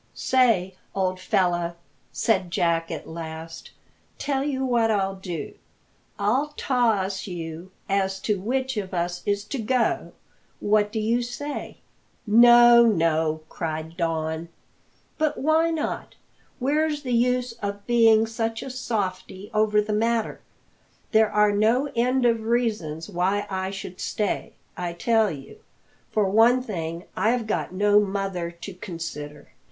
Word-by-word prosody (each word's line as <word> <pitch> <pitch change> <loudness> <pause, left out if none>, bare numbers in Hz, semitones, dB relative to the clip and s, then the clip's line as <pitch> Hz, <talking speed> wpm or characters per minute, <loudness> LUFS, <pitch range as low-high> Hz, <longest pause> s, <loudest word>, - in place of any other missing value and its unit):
"Say, 225 -8 +2 0.2
old 185 -1 0
fellow," 175 -2 0 0.4
said 190 -6 +1
Jack 165 -1 0
at - - -6
last, 165 0 -8 0.5
"tell 275 -2 -1
you 265 -2 -1
what 235 -3 +2
I'll 195 -3 +1
do; 180 -6 -6 0.6
I'll 265 +9 0
toss 210 -8 0
you 170 0 -6 0.2
as 195 -1 0
to 210 -2 0
which 260 +4 -2
of 190 -2 -3
us 175 0 -2
is 205 0 +1
togo. 240 +2 -1 0.5
What 210 0 +2
do 220 - -2
you 230 +3 +1
say?" 245 +5 -5 0.5
"No, 240 +2 +8
no," 160 -7 +2
cried 160 0 -5
Don. 165 -1 -2 0.7
"But 305 -1 +1
why 315 +3 +3
not? 325 -2 -3 0.4
Where's 295 +3 0
the 250 -2 -2
use 250 +1 +2
of 200 0 -4
being 225 -2 +5
such 225 0 -3
a 270 - -6
softie 205 -5 -4
over 210 -1 +3
the 210 0 -3
matter? 225 +1 0 0.7
There 220 -1 +4
are 210 0 +4
no 230 +7 +2
end 250 +2 +2
of 230 -1 +3
reasons 220 -9 -1
why 195 +1 0
I 190 0 -2
should 190 -2 -7
stay, 210 -2 -2 0.2
I 175 -1 -4
tell 220 +4 +2
you. 140 -3 -9 0.5
For 210 -2 +1
one 230 +5 +4
thing, 170 -6 -4
I've 225 +4 +1
got 215 - -2
no 205 +2 +4
mother 195 -4 -2
to 170 +3 -9
consider." 160 -5 -7
210 Hz, 135 wpm, -25 LUFS, 180-235 Hz, 0.7 s, No